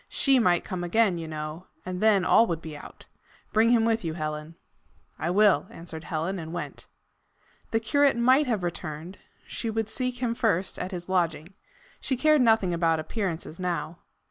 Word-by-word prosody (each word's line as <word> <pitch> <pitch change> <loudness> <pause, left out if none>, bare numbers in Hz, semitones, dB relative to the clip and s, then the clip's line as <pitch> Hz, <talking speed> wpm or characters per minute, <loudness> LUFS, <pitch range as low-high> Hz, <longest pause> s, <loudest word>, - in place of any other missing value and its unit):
SHE 270 -2 +3
might 180 -6 +3
come 180 -1 -4
again, 185 0 +2
you 165 - -6
know, 155 +3 -6 0.2
and 185 0 -4
then 210 -4 +4
all 230 - +5
would 165 -2 -2
be 160 -2 -8
out. - - -12 0.5
Bring 220 +2 +4
him 235 -2 +4
with 225 -1 +1
you, 160 -2 -3
Helen." 155 0 -5 0.6
"I 160 - -1
will," 195 -5 +4
answered 165 -1 -9
Helen, 170 +3 -2
and 160 -1 -7
went. 175 - -6 0.8
The 225 - +1
curate 285 +3 +2
might 260 +4 +4
have 220 -7 -1
returned: 170 +1 -5 0.3
she 230 - -4
would 220 -1 -2
seek 250 +1 -2
him 240 -2 -1
first 220 -7 0
at 180 - -3
his 175 -2 -6
lodging. 175 -2 -1 0.5
She 260 - -1
cared 305 +1 +4
nothing 220 -6 +3
about 165 -1 +2
appearances 170 -2 -4
now. 175 -2 -3
185 Hz, 175 wpm, -26 LUFS, 165-225 Hz, 0.8 s, all